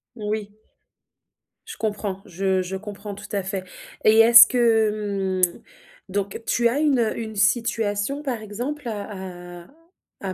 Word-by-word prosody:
Oui. 210 -1 -4 1.1
Je - - -8
comprends, 205 -3 -3
je 190 0 -1
je 185 +1 -4
comprends, 205 0 -8
tout 200 +1 -10
à 200 -2 -1
fait 190 0 -4 0.4
et 220 +1 +6
est-ce 235 +1 +10
que, 210 -5 +1
mmh 175 - -9 0.5
donc 200 +2 -3
tu 235 0 +2
as 260 +5 -1
une 265 -7 +2
une 220 -2 -6
situation, 215 +4 0
par 250 -6 -3
exemple 245 +7 -5
à 185 -5 -7
à - - -20 0.5
à 190 -2 -4
210 Hz, 140 wpm, -23 LUFS, 195-230 Hz, 1.1 s, est-ce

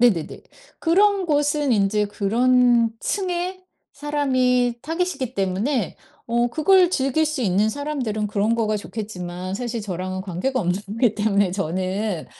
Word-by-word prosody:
네네네. 200 -11 +2 0.4
그런 390 +3 +3
곳은 290 -2 +1
인제 210 0 +2
그런 235 +3 +3
층의 370 -1 -2 0.3
사람이 255 -4 +1
타깃이기 325 -6 -3
때문에 195 - -1 0.3
어 240 +1 +2
그걸 355 +7 +4
즐길 275 0 +1
수 305 -2 -3
있는 200 +1 +2
사람들은 245 -5 -3
그런 210 +2 +1
거가 215 -2 0
좋겠지만 185 -4 -6
사실 235 +1 -3
저랑은 185 -2 -4
관계가 195 +8 -2
없는 200 +3 -3
기 240 -5 +3
때문에 205 -2 +2
저는 185 +1 -2
230 Hz, 285 characters per minute, -22 LUFS, 200-290 Hz, 0.4 s, 그걸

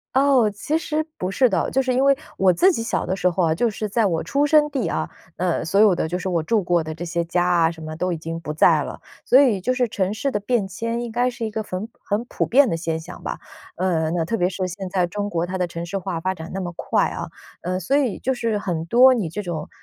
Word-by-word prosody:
哦， 265 -5 +4
其 210 +10 -2
实 310 -1 -2
不 180 - -2
是 255 +7 +3
的。 195 - 0
就 270 - +1
是 255 -1 0
因 255 +2 +2
为 275 0 +4 0.2
我 190 -1 +5
自 365 - +4
己 270 - -2
小 230 - -1
的 185 - -1
时 180 -1 +2
候 180 +1 0
啊， 160 -1 +2
就 235 +7 +1
是 215 0 -4
在 220 +2 +1
我 165 -3 -1
出 285 +1 +1
生 300 0 +5
地 255 -10 -1
啊， - - -2 0.3
呃， 175 -2 0
所 165 +5 +1
有 210 -2 +6
的 165 - -1
就 175 +2 -2
是 185 - -5
我 175 -3 +1
住 215 +5 +1
过 175 -1 +1
的 155 0 -6
这 170 +2 -6
些 170 0 -1
家 175 +1 +1
啊 170 -2 +3
什 165 -1 -12
么 155 0 -6
都 180 +3 -1
已 170 - -2
经 165 +1 -5
不 160 -2 -5
在 155 - +4
了。 - - -7 0.2
所 260 - +6
以 240 -9 +3
就 250 - 0
是 250 -1 +1
城 195 -3 -1
市 245 +6 -2
的 205 - -1
变 210 -1 0
迁 230 +5 -3
应 240 -1 -5
该 245 +2 +1
是 235 -2 -5
一 220 - -4
个 220 - -2
很 205 0 -5 0.2
很 210 +3 -1
普 - - -2
遍 275 +3 +5
的 - - 0
现 165 -1 -2
象 160 - -10
吧， - - -4 0.4
呃， 170 -3 0
那 170 -1 0
特 225 - -1
别 180 -4 +1
是 185 0 -3
现 185 +1 -6
在 180 -1 +1
中 205 +3 -4
国 170 -3 -1
它 185 +1 -4
的 180 - +1
城 170 0 -6
市 180 +3 -3
化 180 -2 -4
发 185 +3 -1
展 165 -2 -9
那 - - -2
么 175 -1 -5
快 - - +1
啊， - - -5 0.3
呃， 185 +1 -2
所 195 +10 0
以 265 -8 0
就 265 - 0
是 230 -3 -1
很 175 -5 -3
多 250 +8 +6
你 210 -10 -1
这 210 +6 -5
种， 165 -4 -5
190 Hz, 305 characters per minute, -22 LUFS, 170-235 Hz, 0.4 s, 有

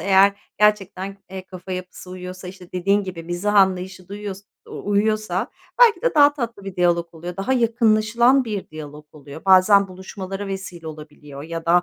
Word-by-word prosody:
eğer 195 0 +5 0.3
gerçekten, 200 -2 +1
eee, 190 -1 -7
kafa 185 0 -8
yapısı 180 0 -7
uyuyorsa, 185 0 -8
işte, 180 -1 -12
dediğin 195 +3 +1
gibi 180 -3 -6
mizah 175 +5 -2
anlayışı 185 -2 +2
da - - -10
uyuyors 205 -2 -6 0.3
u 205 - -6
uyuyorsa 215 +1 0 0.3
belki 470 -2 +6
de - - +1
daha 290 -1 +6
tatlı 235 -7 -5
bir 195 -2 -7
diyalog 170 -1 +1
oluyor, 175 +2 -7
daha 195 +7 -1
yakınlaşılan 235 +1 +3
bir 210 -4 -4
diyalog 150 -1 -9
oluyor. 145 +1 -12
Bazen 195 +1 +6
buluşmalara 190 +1 -7
vesile 190 -4 -6
olabiliyor 150 -2 -10
ya 165 +1 -6
da 175 +1 +5
190 Hz, 170 wpm, -22 LUFS, 175-205 Hz, 0.3 s, belki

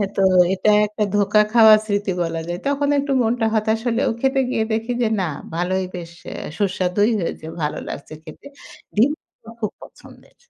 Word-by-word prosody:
তো 195 - +1 0.3
এটা 195 +3 +2 0.2
একটা 210 0 -3
ধোকা 205 +1 +4
খাওয়া 220 -2 +8
স্মৃতি 205 -2 -1
বলা 165 0 -3
যায়। 175 0 -4
তখন 285 0 0
একটু 280 0 -2
মনটা 230 0 0
হতাশ 220 +1 +1
হলেও 235 +2 +1
খেতে 270 0 +2
গিয়ে 225 - 0
দেখি 225 +2 -2
যে, 230 - +2
না - - 0 0.3
ভালোই 185 +2 -1
বেশ 170 -1 -7 0.5
সুস্বাদুই 195 +2 +1
হয়েছে, 165 -2 -4 0.2
ভালো 150 - -2
লাগছে 140 - -8
খেতে। 160 - -12 0.5
ডিম 235 +8 +4 0.5
খুব 215 - -1
পছন্দের, - - -17
210 Hz, 160 wpm, -21 LUFS, 185-230 Hz, 0.5 s, খাওয়া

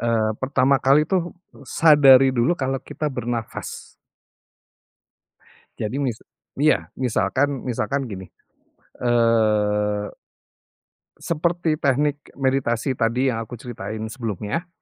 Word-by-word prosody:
eee, 115 -2 +1
pertama 135 +1 +3
kali 140 +3 +4
tuh, 175 -1 -1 0.3
sadari 135 -4 +6
dulu 120 +5 +2
kalau 135 -1 -2
kita 155 - -5
bernafas. 120 -2 -5 1.9
Jadi 110 +4 -3
mis 125 -5 -1 0.4
iya 155 +1 +2
misalkan 130 +3 0
misalkan 135 +3 -2
gini, 95 -4 -7 0.8
eee 105 -3 +1 1.0
seperti 170 -1 -1
teknik 145 +2 +1 0.2
meditasi 130 -2 0
tadi 125 +2 +1
yang 115 - -3
aku 115 +2 -7
ceritain 110 -2 -7
sebelumnya. 115 - -4
125 Hz, 95 wpm, -22 LUFS, 115-140 Hz, 1.9 s, sadari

